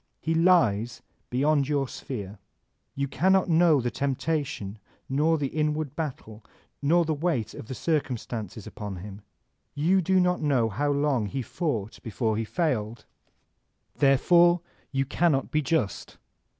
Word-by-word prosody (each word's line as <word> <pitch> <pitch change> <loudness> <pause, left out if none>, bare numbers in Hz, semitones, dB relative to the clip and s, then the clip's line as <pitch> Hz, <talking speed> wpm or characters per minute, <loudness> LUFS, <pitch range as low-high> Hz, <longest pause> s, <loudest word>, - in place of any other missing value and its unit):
He 165 - -1
lies 120 - +3 0.3
beyond 140 +2 +2
your 140 -2 +1
sphere; 105 -7 -7 0.6
you 140 0 -1
cannot 190 +6 +2
know 165 -2 +5
die 120 -1 -2
temptation 135 -7 -2 0.3
nor 155 +4 +2
the 140 -3 -2
inward 150 -1 -1
battle 120 -9 -6 0.4
nor 165 +4 +3
the 160 - 0
weight 145 -8 -1
of - - -9
the 130 - -5
circumstances 120 - -3
upon 105 -2 -6
him. 100 +3 -9 0.5
You 175 +6 +3
do 190 +2 +2
not 180 0 +1
know 135 -7 +2
how 145 +8 0
long 140 -6 +1
he 130 +5 -3
fought 115 - -3
before 110 0 -1
he 110 +1 -2
failed. 120 -7 -2 0.9
Therefore 170 +5 +5 0.3
you 135 0 0
cannot 140 -1 +1
be 155 - +2
just. 135 -7 -2
140 Hz, 135 wpm, -26 LUFS, 115-160 Hz, 0.9 s, know